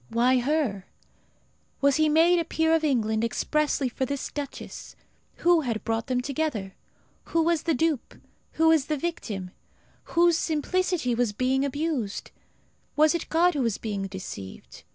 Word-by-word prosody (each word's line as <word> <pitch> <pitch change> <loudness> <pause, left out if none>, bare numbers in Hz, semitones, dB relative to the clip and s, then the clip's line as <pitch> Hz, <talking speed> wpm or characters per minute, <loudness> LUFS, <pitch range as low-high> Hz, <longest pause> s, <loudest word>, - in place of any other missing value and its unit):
Why 250 +2 +3
her? 245 -8 -1 0.9
Was 280 -1 +3
he 310 -1 +3
made 335 +3 +5
a - - +1
peer 320 0 +1
of 325 -1 +2
England 220 -6 +1
expressly 285 +4 0
for 250 +2 -3
this 280 +1 -3
duchess? 285 -2 -7 0.4
Who 345 -1 +3
had 230 -6 -3
brought 225 +2 -2
them 250 -2 0
together? 255 -8 -3 0.5
Who 330 -1 +1
was 335 -1 +2
the 330 - 0
dupe? 310 -1 -1 0.4
Who 320 0 +5
the 305 0 -1
victim? 220 - -4 0.7
Whose 340 -1 +5
simplicity 330 -3 0
was 235 -3 0
being 260 +4 +1
abused? 280 -6 -2 0.6
Was 305 +2 +5
it 340 - -3
God 350 +2 +3
who 290 - -1
was 230 -4 0
being 200 -3 -3
deceived? 185 - -9
280 Hz, 150 wpm, -26 LUFS, 230-320 Hz, 0.9 s, made